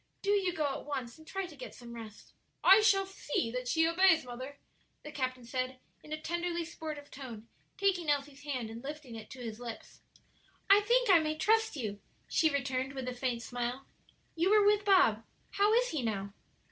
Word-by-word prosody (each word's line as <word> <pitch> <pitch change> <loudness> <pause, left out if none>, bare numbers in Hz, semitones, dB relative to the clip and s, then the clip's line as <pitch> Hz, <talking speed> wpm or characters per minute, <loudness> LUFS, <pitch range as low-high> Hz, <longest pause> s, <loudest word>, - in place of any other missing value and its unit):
Do 400 - +2
you 390 -3 +2
go 315 -3 -1
at 275 -1 -2
once 260 -3 -4
and 315 - -16
try 390 +1 -3
to 335 -4 -11
get 260 - -9
some 240 -1 -10
rest." 225 -2 -10 0.3
"I 390 +3 +8
shall 395 -2 +4
see 295 -11 -2
that 250 +1 -4
she 325 +5 +3
obeys, 335 -3 +4
mother," 255 +3 -7 0.5
the 300 - -8
captain 255 -4 -3
said, 255 +2 -3 0.2
in 305 - -14
a 310 - -3
tenderly 345 +1 -2
sportive 310 -3 -7
tone, 235 -5 -9 0.3
taking 370 -5 +1
Elsie's 285 -1 -1
hand 255 -6 -4
and 230 +2 -8
lifting 290 -3 -7
it 220 -1 -9
to 255 -2 -9
his 225 -1 -6
lips. 235 -2 -8 0.7
"I 400 - +9
think 475 +1 +3
I 350 - +8
may 310 0 -1
trust 445 +5 +2
you," 215 -7 -4 0.3
she 320 - +3
returned, 265 -1 -1
with 265 -2 -5
a - - -4
faint 245 -2 -2
smile. 245 +3 -3 0.5
"You 340 +3 +2
were 420 0 +5
with 415 0 +4
Bob; 365 - +5 0.3
how 405 +1 +3
is - - +3
he 310 - -2
now?" 200 -4 -3
285 Hz, 195 wpm, -32 LUFS, 245-355 Hz, 0.7 s, I